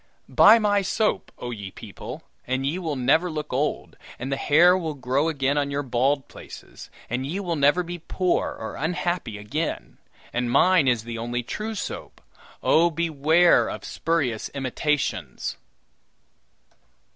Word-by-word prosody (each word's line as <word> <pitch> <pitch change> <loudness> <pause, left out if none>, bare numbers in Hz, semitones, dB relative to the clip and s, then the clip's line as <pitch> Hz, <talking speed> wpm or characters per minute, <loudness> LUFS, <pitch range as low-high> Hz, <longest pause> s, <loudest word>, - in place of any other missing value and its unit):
"Buy 220 +3 +7
my 205 -2 +2
soap, 210 +3 -1
oh 120 - -6
ye 100 -4 -6
people, - - -9 0.2
and 130 +1 -1
ye 155 +7 -1
will 160 -5 -3
never 145 +8 +2
look 150 -3 -5
old, 145 +4 -2 0.2
and 130 +3 -5
the - - +1
hair 170 +6 +5
will 160 -5 -3
grow 135 +4 0
again 140 -1 0
on 140 -1 -1
your 140 +1 -2
bald 135 +2 0
places, - - -12 0.2
and 125 +2 -2
ye 175 +7 -3
will 175 -4 -2
never 145 +5 +3
be 175 0 -6
poor 180 +2 0
or - - -7
unhappy 170 -7 -2
again; 145 +11 -4 0.3
and 120 0 -1
mine 165 +4 +4
is 120 -4 +2
the 115 0 -6
only 120 +1 -3
true 215 - -4
soap. - - -6 0.4
Oh, 170 +2 +4
beware 165 +1 +3
of - - -7
spurious 140 -10 -1
imitations!" 140 +2 -2
145 Hz, 150 wpm, -24 LUFS, 130-175 Hz, 0.4 s, Buy